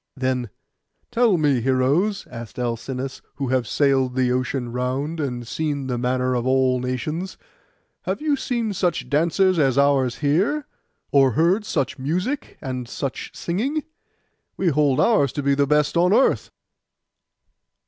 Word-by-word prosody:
Then, 130 -3 -1 0.6
'Tell 235 -5 +3
me, 145 -6 +2
heroes,' 140 - +1
asked 115 -2 -9
Alcinous, 125 +2 -4
'you - - -38
who 140 - -3
have 130 -2 +1
sailed 135 -3 +2
the 130 -1 +2
ocean 125 -1 -1
round, 130 +6 -2
and 125 -5 -3
seen 145 -1 -2
the 125 -2 -2
manners 125 0 0
of 120 - -3
all 130 -1 +3
nations, 150 +9 -3 0.7
have - - -2
you 300 -1 +1
seen 235 -5 -2
such 175 -3 -1
dancers 170 +4 +3
as 135 -3 +2
ours 140 -3 +3
here, 190 - +1 0.5
or 135 -3 +4
heard 180 - +2
such 140 - -2
music 180 - -2
and 125 -4 -5
such 135 -2 -4
singing? 265 - -2 0.7
We 185 - +2
hold 145 -3 +2
ours 145 - +3
to 145 - -3
be 140 0 +3
the 140 0 +2
best 150 +2 +2
on 180 +3 +4
earth. 265 - +3
140 Hz, 150 wpm, -22 LUFS, 130-170 Hz, 0.7 s, or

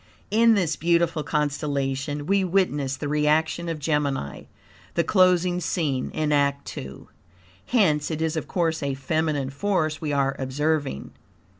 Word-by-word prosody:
In 225 +1 +5
this 170 -7 +1
beautiful 170 -1 +2
constellation 145 -1 -2
we 195 +3 +2
witness 150 -8 0
the 145 - -4
reaction 155 +3 +1
of 165 - -2
Gemini, 145 - -2 0.5
the 170 - +3
closing 180 0 +3
scene 150 -6 -1
in 155 -1 -1
act 140 -1 0
II. 65 +1 -7 0.7
Hence 165 -12 +2
it 160 -2 -3
is, 160 0 -1
of 160 - -3
course, 165 -3 0
a 140 -1 -1
feminine 145 -1 -1
force 155 -2 -1
we 155 -2 -2
are 135 -1 +1
observing. 140 - -1
150 Hz, 140 wpm, -24 LUFS, 140-170 Hz, 0.7 s, In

